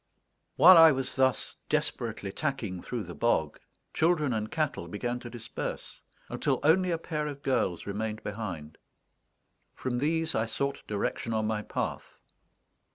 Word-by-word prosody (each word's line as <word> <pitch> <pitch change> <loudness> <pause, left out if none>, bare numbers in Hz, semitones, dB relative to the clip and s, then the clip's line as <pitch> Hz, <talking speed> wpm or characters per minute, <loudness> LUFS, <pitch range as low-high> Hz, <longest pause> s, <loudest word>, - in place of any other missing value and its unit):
While 170 +5 +9
I 165 -1 +9
was 135 -2 -3
thus 130 -3 +1
desperately 125 -9 -2
tacking 115 - -3
through 120 -3 -4
the 85 -1 -8
bog, 85 -10 0 0.3
children 155 -5 +2
and 110 -1 -2
cattle 155 - -2
began 120 +7 -3
to 120 - -8
disperse, 120 -2 -6 0.3
until - - 0
only 180 +5 +4
a 170 - +1
pair 155 -2 -3
of 140 -2 -7
girls 110 -10 0
remained 105 +2 -3
behind. 95 -8 -6 1.0
From 125 -1 -2
these 160 +3 0
I 110 +1 0
sought 140 +5 -2
direction 110 +2 -2
on 110 0 +1
my 110 -1 -1
path. - - -4
120 Hz, 145 wpm, -29 LUFS, 105-150 Hz, 1.0 s, While